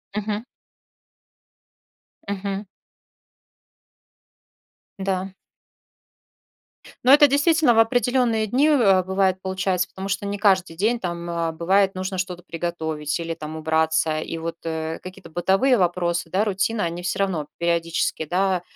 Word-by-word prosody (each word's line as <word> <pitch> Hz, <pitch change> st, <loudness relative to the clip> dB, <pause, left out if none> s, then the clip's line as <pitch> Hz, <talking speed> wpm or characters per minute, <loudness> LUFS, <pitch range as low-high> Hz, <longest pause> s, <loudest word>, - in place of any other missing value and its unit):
Мгм. 210 Hz, +1 st, -2 dB, 1.8 s
Мгм. 200 Hz, 0 st, -3 dB, 2.3 s
Да. 190 Hz, -1 st, -2 dB, 1.7 s
Ну, 255 Hz, -, +5 dB
это 290 Hz, +1 st, +9 dB
действительно 290 Hz, 0 st, +3 dB
в 225 Hz, -, +3 dB
определенные 240 Hz, -1 st, +2 dB
дни, 255 Hz, +8 st, +2 dB
э, 205 Hz, -11 st, +4 dB
бывает, 190 Hz, 0 st, +1 dB
получается, 190 Hz, -1 st, -1 dB
потому 190 Hz, +1 st, -7 dB
что 200 Hz, +1 st, -2 dB
не 200 Hz, 0 st, -3 dB
каждый 190 Hz, -5 st, +2 dB
день 220 Hz, +7 st, +1 dB
там, 170 Hz, -3 st, -4 dB
э, 170 Hz, -1 st, -1 dB
бывает 190 Hz, +4 st, +2 dB
нужно 185 Hz, 0 st, -3 dB
что-то 180 Hz, -1 st, -4 dB
приготовить 160 Hz, -3 st, -3 dB
или 165 Hz, 0 st, -3 dB
там 155 Hz, -1 st, -7 dB
убраться, 160 Hz, 0 st, +1 dB
и 165 Hz, -, -5 dB
вот, 165 Hz, 0 st, -5 dB
э, 160 Hz, 0 st, -3 dB
какие-то 185 Hz, -1 st, -11 dB
бытовые 195 Hz, +10 st, +2 dB
вопросы, 175 Hz, -1 st, 0 dB
да, 195 Hz, +5 st, +1 dB
рутина, 205 Hz, +2 st, 0 dB
они 170 Hz, +1 st, -3 dB
всё 185 Hz, -, -3 dB
равно 180 Hz, -7 st, -1 dB
периодически, 170 Hz, -1 st, 0 dB
да, 185 Hz, +2 st, +1 dB
185 Hz, 125 wpm, -23 LUFS, 170-205 Hz, 2.3 s, это